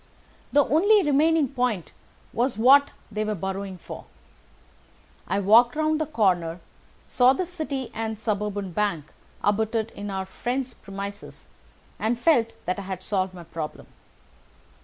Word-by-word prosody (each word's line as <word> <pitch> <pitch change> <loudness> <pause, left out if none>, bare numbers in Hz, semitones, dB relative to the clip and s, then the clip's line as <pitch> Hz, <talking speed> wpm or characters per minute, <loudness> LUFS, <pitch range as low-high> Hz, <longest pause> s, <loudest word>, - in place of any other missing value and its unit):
The 290 0 +5
only 400 +7 +4
remaining 300 +1 +3
point 245 - -1 0.4
was 240 -1 0
what 275 +5 +6 0.2
they 215 +1 -1
were 215 0 -1
burrowing 195 0 -4
for. - - -9 1.2
I 195 - 0
walked 230 +6 +5
round 310 0 +1
the 310 - -1
corner, 180 - +1 0.5
saw 250 +1 +4
the 365 +7 -2
City 295 -7 -4
and 220 -1 -3
Suburban 205 -3 -2
Bank 170 -6 -2 0.3
abutted 220 +2 +1
on 205 0 -6
our 190 -1 -3
friend's 245 +6 -3
premises, 200 0 -8 0.5
and 230 +2 0
felt 240 -7 +3
that 180 +2 -1
I - - -4
had 190 -1 -6
solved 185 -2 -1
my 175 - -9
problem. 165 -2 -6
220 Hz, 135 wpm, -25 LUFS, 195-265 Hz, 1.2 s, what